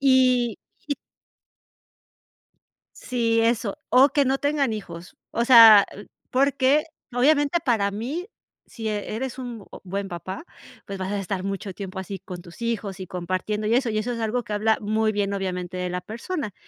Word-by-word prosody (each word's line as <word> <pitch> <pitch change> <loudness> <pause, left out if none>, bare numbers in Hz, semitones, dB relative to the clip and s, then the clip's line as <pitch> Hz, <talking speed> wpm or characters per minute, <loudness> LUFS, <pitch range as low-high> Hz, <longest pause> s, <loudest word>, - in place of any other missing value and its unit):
Y 255 -4 +3 0.3
y 285 - +1 2.0
Sí, 230 -2 0
eso, 230 -3 0
o 265 +3 +6
que 285 0 +2
no 265 +1 +2
tengan 285 -5 +1
hijos, 175 -4 -8 0.2
o 235 +1 0
sea, 225 -5 +9
l 205 - -11 0.2
porque, 275 +2 +3 0.3
obviamente, 290 +5 +3
para 220 -6 +2
mí, 275 - -4 0.4
si 225 -2 -6
e 210 0 -3
eres 260 +2 -4
un 240 -5 -7 0.2
buen 195 +1 -4
papá, 185 - -6 0.4
pues, 195 -1 -6
vas 185 +1 -3
a 205 - -1
estar 190 -1 -3
mucho 195 0 -4
tiempo 190 -1 -6
así 190 +1 -6
con 180 -1 -8
tus 170 +4 -14
hijos 215 -4 -3
y 185 - -6
compartiendo, 185 +4 -3
y 230 - +3
eso 250 -1 +2
y 215 - -1
eso 215 +3 -1
es 235 - -4
algo 230 +2 -1
que 210 - -6
habla 220 +1 +2
muy 215 +1 +1
bien, 200 -1 -1
obviamente, 185 -2 -3
de 180 0 -2
la 180 0 -3
persona. 230 - -5
215 Hz, 175 wpm, -24 LUFS, 195-250 Hz, 2.0 s, sea